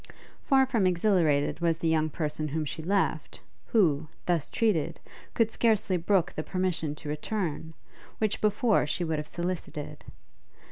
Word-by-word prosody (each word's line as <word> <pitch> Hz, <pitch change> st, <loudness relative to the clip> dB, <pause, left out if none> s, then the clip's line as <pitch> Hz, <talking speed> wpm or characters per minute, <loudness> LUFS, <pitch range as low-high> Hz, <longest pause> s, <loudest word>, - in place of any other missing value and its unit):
Far 270 Hz, -2 st, +4 dB
from 230 Hz, -8 st, +2 dB
exhilarated 170 Hz, -6 st, +2 dB
was 165 Hz, -1 st, +1 dB
the 165 Hz, -, -2 dB
young 155 Hz, -1 st, +2 dB
person 155 Hz, 0 st, -3 dB
whom 155 Hz, +1 st, -2 dB
she 155 Hz, +2 st, -5 dB
left, 195 Hz, +5 st, -1 dB, 0.3 s
who, 160 Hz, -, +2 dB, 0.2 s
thus 170 Hz, -4 st, 0 dB
treated, 170 Hz, -8 st, 0 dB, 0.4 s
could 225 Hz, -1 st, +2 dB
scarcely 215 Hz, -5 st, +2 dB
brook 180 Hz, +1 st, +1 dB
the -, -, -2 dB
permission 175 Hz, -4 st, -2 dB
to 150 Hz, -, -8 dB
return, 160 Hz, 0 st, -3 dB, 0.4 s
which 215 Hz, -1 st, -1 dB
before 215 Hz, -, +2 dB
she 175 Hz, -, -1 dB
would 160 Hz, -2 st, -1 dB
have 150 Hz, -, -6 dB
solicited. 175 Hz, -4 st, -5 dB
170 Hz, 145 wpm, -28 LUFS, 155-205 Hz, 0.4 s, Far